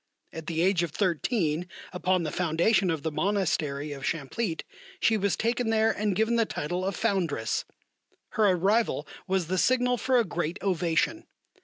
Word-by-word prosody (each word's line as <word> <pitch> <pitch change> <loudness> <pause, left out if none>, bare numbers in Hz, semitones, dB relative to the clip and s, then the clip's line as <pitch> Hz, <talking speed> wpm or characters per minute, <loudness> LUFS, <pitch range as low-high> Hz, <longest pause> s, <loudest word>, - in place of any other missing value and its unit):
At 160 -1 -7
the 165 -1 -1
age 185 -2 +3
of 170 - -1
thirteen, 175 - 0 0.3
upon 180 0 +1
the 155 - -2
foundation 180 +4 +2
of 160 -4 -1
the 160 - -1
Monastery 150 -6 0
of 140 -2 -7
Champlitte, 165 - -2 0.4
she 225 - +3
was 200 -2 +1
taken 235 +1 0
there 220 0 +3
and 205 -2 -1
given 220 +4 +2
the 230 - +3
title 175 +5 -3
of 195 +1 -1
Foundress. 175 - 0 0.6
Her 215 -2 +2
arrival 195 +6 +1 0.2
was 190 -2 +1
the 185 +3 -1
signal 250 +1 +3
for 255 +3 +2
a 235 - +3
great 175 0 -2
ovation. 180 - 0
185 Hz, 165 wpm, -27 LUFS, 165-220 Hz, 0.6 s, age